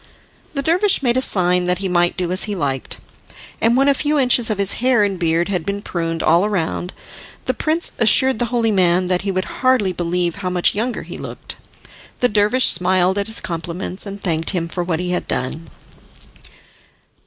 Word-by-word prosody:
The 275 Hz, -2 st, -3 dB
dervish 360 Hz, +2 st, +2 dB
made 240 Hz, -2 st, +2 dB
a 260 Hz, -, +2 dB
sign 180 Hz, -6 st, +2 dB
that 180 Hz, 0 st, 0 dB
he 195 Hz, +1 st, -3 dB
might 175 Hz, -1 st, +1 dB
do 180 Hz, -1 st, -2 dB
as 185 Hz, -, 0 dB
he 210 Hz, -1 st, -4 dB
liked, 135 Hz, -6 st, -2 dB, 0.6 s
and 230 Hz, +2 st, +3 dB
when 270 Hz, +1 st, +3 dB
a 280 Hz, -, +5 dB
few 295 Hz, +2 st, 0 dB
inches 250 Hz, -3 st, +3 dB
of 215 Hz, -, -1 dB
his 200 Hz, -1 st, +2 dB
hair 250 Hz, -4 st, +3 dB
and 195 Hz, -3 st, -1 dB
beard 170 Hz, 0 st, +1 dB
had 180 Hz, -4 st, -2 dB
been 200 Hz, +3 st, -4 dB
pruned 165 Hz, -2 st, -3 dB
all 175 Hz, +6 st, +3 dB
round 180 Hz, -1 st, -2 dB, 0.5 s
the -, -, 0 dB
prince 320 Hz, +2 st, -1 dB
assured 255 Hz, +2 st, +4 dB
the 240 Hz, -, +1 dB
holy 230 Hz, -1 st, 0 dB
man 180 Hz, -2 st, +2 dB
that 180 Hz, -1 st, +1 dB
he 195 Hz, -, -4 dB
would 185 Hz, 0 st, -2 dB, 0.2 s
hardly 255 Hz, -8 st, +2 dB
believe 175 Hz, 0 st, -1 dB
how 190 Hz, -2 st, -3 dB
much 180 Hz, -1 st, +2 dB
younger 230 Hz, +4 st, -3 dB
he -, -, -9 dB
looked. -, -, -8 dB, 0.6 s
The 245 Hz, -, +2 dB
dervish 210 Hz, +5 st, +3 dB
smiled 185 Hz, +1 st, +2 dB
at 200 Hz, -, -2 dB
his 220 Hz, -, +1 dB
compliments, 175 Hz, +4 st, -5 dB
and 200 Hz, 0 st, -7 dB
thanked 165 Hz, -4 st, -2 dB
him 175 Hz, -3 st, -2 dB
for 175 Hz, +1 st, -3 dB
what 170 Hz, -2 st, -2 dB
he 180 Hz, 0 st, -3 dB
had 180 Hz, -, -2 dB
done. 150 Hz, +6 st, -3 dB
190 Hz, 200 wpm, -19 LUFS, 175-230 Hz, 0.6 s, a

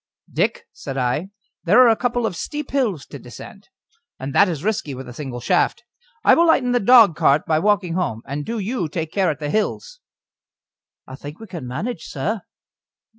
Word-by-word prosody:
"Dick," -, -, 0 dB
said 135 Hz, -, -7 dB
I, 130 Hz, +8 st, -1 dB, 0.3 s
"there 195 Hz, +7 st, +5 dB
are -, -, +6 dB
a 225 Hz, -, +4 dB
couple 245 Hz, 0 st, -1 dB
of 190 Hz, -, -2 dB
steep 295 Hz, -, -5 dB
hills 220 Hz, -, 0 dB
to -, -, -10 dB
descend, -, -, -12 dB, 0.5 s
and 135 Hz, +1 st, -6 dB
that 200 Hz, -, +5 dB
is 160 Hz, -3 st, -4 dB
risky 210 Hz, -9 st, -2 dB
with 130 Hz, 0 st, -8 dB
a 125 Hz, -, -9 dB
single 130 Hz, -3 st, -6 dB
shaft. 180 Hz, -, +1 dB, 0.4 s
I -, -, +6 dB
will 340 Hz, +1 st, +4 dB
lighten 250 Hz, -6 st, +3 dB
the 245 Hz, -, +3 dB
dogcart 195 Hz, -, +5 dB
by 155 Hz, -1 st, +2 dB
walking 200 Hz, -2 st, +1 dB
home, 125 Hz, -11 st, -2 dB
and 145 Hz, +2 st, -4 dB
do 230 Hz, +8 st, -4 dB
you 210 Hz, -4 st, -2 dB
take 160 Hz, 0 st, -4 dB
care 190 Hz, -3 st, +1 dB
at 150 Hz, -, -2 dB
the 145 Hz, -1 st, -3 dB
hills." 485 Hz, -, -2 dB, 1.1 s
"I 130 Hz, -, -11 dB
think 145 Hz, +3 st, -9 dB
we 225 Hz, -, -9 dB
can 170 Hz, -, -7 dB
manage, 170 Hz, -, -4 dB
sir." 195 Hz, +10 st, -3 dB
180 Hz, 190 wpm, -21 LUFS, 145-225 Hz, 1.1 s, are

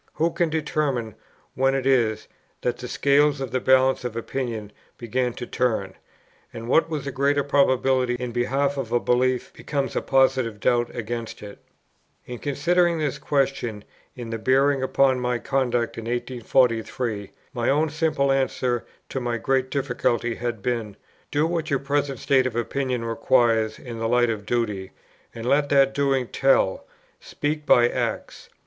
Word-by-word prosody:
Who 165 Hz, +2 st, +1 dB
can 170 Hz, 0 st, 0 dB
determine 150 Hz, -7 st, -1 dB, 0.4 s
when 135 Hz, +1 st, +2 dB
it 135 Hz, -1 st, -2 dB
is, 115 Hz, -5 st, +2 dB, 0.3 s
that 125 Hz, -1 st, -1 dB
the 125 Hz, -, -6 dB
scales 145 Hz, +2 st, +2 dB
in 135 Hz, -3 st, -4 dB
the 130 Hz, -, 0 dB
balance 130 Hz, 0 st, +3 dB
of 120 Hz, -2 st, -4 dB
opinion 115 Hz, -3 st, -4 dB, 0.3 s
begin 125 Hz, +1 st, -1 dB
to 120 Hz, -, -6 dB
turn, 110 Hz, -7 st, -1 dB, 0.6 s
and 115 Hz, 0 st, -8 dB
what 160 Hz, +6 st, +3 dB
was 155 Hz, -3 st, -3 dB
a 140 Hz, -, -3 dB
greater 140 Hz, +2 st, +1 dB
probability 130 Hz, -2 st, +2 dB
in 125 Hz, 0 st, -4 dB
behalf 135 Hz, +4 st, 0 dB
of 125 Hz, -4 st, -4 dB
a 120 Hz, -, +3 dB
belief 125 Hz, +1 st, 0 dB
becomes 140 Hz, -2 st, -3 dB
a -, -, +1 dB
positive 130 Hz, -5 st, +2 dB
doubt 120 Hz, +4 st, +1 dB
against 115 Hz, -1 st, -5 dB
it? 100 Hz, -1 st, -10 dB, 0.7 s
In 125 Hz, -1 st, -7 dB
considering 170 Hz, +4 st, +1 dB
this 150 Hz, -4 st, -2 dB
question 135 Hz, -7 st, -1 dB, 0.3 s
in 115 Hz, -2 st, -6 dB
its 115 Hz, -, -4 dB
bearing 135 Hz, +1 st, +3 dB
upon 130 Hz, 0 st, +2 dB
my 125 Hz, 0 st, 0 dB
conduct 120 Hz, -3 st, -1 dB
in 115 Hz, -, -7 dB
1843, 120 Hz, -3 st, 0 dB, 0.2 s
my 120 Hz, -3 st, 0 dB
own 155 Hz, +3 st, +2 dB
simple 155 Hz, -3 st, +1 dB
answer 130 Hz, -3 st, 0 dB, 0.3 s
to 135 Hz, -, -3 dB
my 120 Hz, -1 st, -2 dB
great 130 Hz, +2 st, 0 dB
difficulty 120 Hz, -3 st, -1 dB
had 120 Hz, -3 st, -4 dB
been, 110 Hz, -4 st, -2 dB, 0.3 s
Do 150 Hz, +2 st, +1 dB
what 165 Hz, -1 st, -2 dB
your 140 Hz, -, +2 dB
present 140 Hz, 0 st, -1 dB
state 130 Hz, +1 st, +2 dB
of 120 Hz, -, -5 dB
opinion 125 Hz, 0 st, -2 dB
requires 115 Hz, -1 st, +2 dB
in 115 Hz, -3 st, -8 dB
the 115 Hz, -, -1 dB
light 120 Hz, -1 st, +3 dB
of 105 Hz, -2 st, -6 dB
duty, 105 Hz, -5 st, -2 dB, 0.4 s
and 115 Hz, 0 st, -6 dB
let 140 Hz, +3 st, +2 dB
that 135 Hz, -1 st, +4 dB
doing 135 Hz, -3 st, +1 dB
tell: 135 Hz, -8 st, +2 dB, 0.3 s
speak 150 Hz, 0 st, -4 dB
by 120 Hz, -1 st, +6 dB
acts. -, -, -4 dB
130 Hz, 160 wpm, -24 LUFS, 120-140 Hz, 0.7 s, by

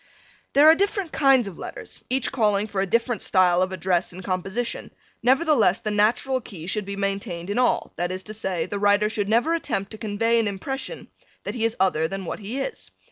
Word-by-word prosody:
There 285 Hz, +2 st, +6 dB
are 315 Hz, -, +10 dB
different 395 Hz, -1 st, -1 dB
kinds 270 Hz, -6 st, +4 dB
of 185 Hz, -, -9 dB
letters, -, -, -9 dB
each 260 Hz, +1 st, 0 dB
calling 210 Hz, -5 st, +2 dB
for 200 Hz, -2 st, -2 dB
a 195 Hz, -, -1 dB
different 230 Hz, +4 st, 0 dB
style 180 Hz, -2 st, +3 dB
of 185 Hz, 0 st, 0 dB
address 185 Hz, -1 st, 0 dB
and 185 Hz, +1 st, -9 dB
composition, 195 Hz, +6 st, -3 dB, 0.3 s
nevertheless 265 Hz, -, +3 dB
the 215 Hz, -, -3 dB
natural 235 Hz, +5 st, +1 dB
key 175 Hz, -7 st, -10 dB
should 210 Hz, +3 st, -2 dB
be 200 Hz, 0 st, -5 dB
maintained 195 Hz, -2 st, -3 dB
in 220 Hz, -, 0 dB
all, 250 Hz, -, +1 dB
that 175 Hz, +1 st, -1 dB
is 185 Hz, 0 st, -5 dB
to 215 Hz, -, -7 dB
say, 190 Hz, -6 st, -2 dB
the 205 Hz, -, -4 dB
writer 205 Hz, +1 st, +3 dB
should 205 Hz, -2 st, -2 dB
never 240 Hz, +9 st, +3 dB
attempt 195 Hz, -12 st, -2 dB
to 220 Hz, -, -9 dB
convey 230 Hz, +2 st, +1 dB
an 225 Hz, -, +1 dB
impression 265 Hz, -, -5 dB, 0.3 s
that -, -, -4 dB
he 225 Hz, -2 st, -1 dB
is 230 Hz, 0 st, 0 dB
other 160 Hz, -4 st, +2 dB
than 195 Hz, +2 st, -5 dB
what -, -, -5 dB
he 220 Hz, +6 st, -5 dB
is. 485 Hz, -, -5 dB
210 Hz, 210 wpm, -24 LUFS, 190-245 Hz, 0.3 s, are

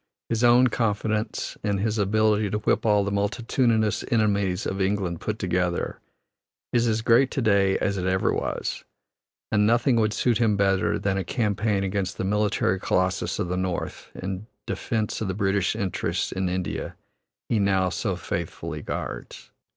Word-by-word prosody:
His 115 Hz, 0 st, 0 dB
own 120 Hz, +1 st, +6 dB
confidence 110 Hz, -2 st, -1 dB
in 100 Hz, -1 st, +1 dB
his 110 Hz, +2 st, -1 dB
ability 105 Hz, +1 st, +2 dB
to 105 Hz, -, -1 dB
whip 105 Hz, +2 st, +1 dB
all 105 Hz, -1 st, +4 dB
the 100 Hz, -, -2 dB
multitudinous 110 Hz, +1 st, +1 dB
enemies 100 Hz, -4 st, +1 dB
of 95 Hz, +1 st, -2 dB
England 95 Hz, -3 st, -1 dB
put 110 Hz, -1 st, -2 dB
together, 90 Hz, -2 st, -1 dB, 0.7 s
is 120 Hz, -1 st, +3 dB
as 110 Hz, 0 st, 0 dB
great 120 Hz, +3 st, +5 dB
to 135 Hz, -, -2 dB
day 100 Hz, -3 st, +3 dB
as 100 Hz, -1 st, -1 dB
it 90 Hz, -, -1 dB
ever 95 Hz, 0 st, +1 dB
was, -, -, -3 dB, 0.7 s
and 105 Hz, 0 st, +3 dB
nothing 120 Hz, +2 st, +3 dB
would 110 Hz, -1 st, +2 dB
suit 120 Hz, 0 st, +1 dB
him 110 Hz, -4 st, +3 dB
better 95 Hz, -1 st, +2 dB
than 95 Hz, -1 st, 0 dB
a -, -, -1 dB
campaign 105 Hz, 0 st, 0 dB
against 95 Hz, -1 st, -2 dB
the -, -, -2 dB
military 100 Hz, -1 st, +1 dB
colossus 95 Hz, -1 st, 0 dB
of -, -, -1 dB
the 90 Hz, +1 st, -2 dB
North 90 Hz, -1 st, -3 dB
in 95 Hz, +3 st, -5 dB, 0.2 s
defence 110 Hz, -2 st, -2 dB
of 110 Hz, -, -1 dB
the 95 Hz, -, -2 dB
British 100 Hz, -1 st, +1 dB
interests 95 Hz, -3 st, -2 dB
in 95 Hz, -1 st, -1 dB
India 90 Hz, -1 st, -3 dB, 0.5 s
he 115 Hz, -, +1 dB
now 95 Hz, -2 st, +2 dB
so 100 Hz, 0 st, -2 dB
faithfully 85 Hz, -1 st, -4 dB
guards. -, -, -6 dB
100 Hz, 165 wpm, -25 LUFS, 95-110 Hz, 0.7 s, own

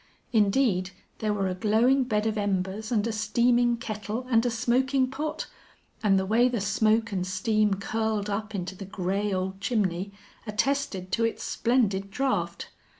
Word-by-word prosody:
Indeed, 205 Hz, -3 st, +2 dB, 0.3 s
there 215 Hz, -1 st, 0 dB
were 200 Hz, -2 st, 0 dB
a 185 Hz, -, -1 dB
glowing 225 Hz, +8 st, +3 dB
bed 215 Hz, -3 st, 0 dB
of 220 Hz, -1 st, 0 dB
embers 205 Hz, +1 st, -2 dB
and 215 Hz, -3 st, +2 dB
a 230 Hz, -, -1 dB
steaming 235 Hz, +3 st, +2 dB
kettle 215 Hz, +1 st, -4 dB
and 230 Hz, -1 st, +4 dB
a 245 Hz, -, +1 dB
smoking 255 Hz, +3 st, +1 dB
pot; 305 Hz, +3 st, -3 dB, 0.6 s
and 200 Hz, -4 st, +4 dB
the 190 Hz, -, +1 dB
way 235 Hz, +5 st, +3 dB
the 240 Hz, -2 st, -1 dB
smoke 215 Hz, +3 st, +2 dB
and 185 Hz, -2 st, -1 dB
steam 215 Hz, +1 st, +1 dB
curled 215 Hz, +1 st, -1 dB
up 210 Hz, +1 st, -3 dB
into 185 Hz, 0 st, -3 dB
the 195 Hz, -, -8 dB
gray 195 Hz, +2 st, -2 dB
old 190 Hz, +1 st, -2 dB
chimney 200 Hz, -4 st, 0 dB, 0.4 s
attested 210 Hz, -4 st, -1 dB
to 230 Hz, -, +1 dB
its 230 Hz, -, -1 dB
splendid 210 Hz, -5 st, +1 dB
draught. 265 Hz, +6 st, -2 dB
215 Hz, 160 wpm, -27 LUFS, 195-235 Hz, 0.6 s, and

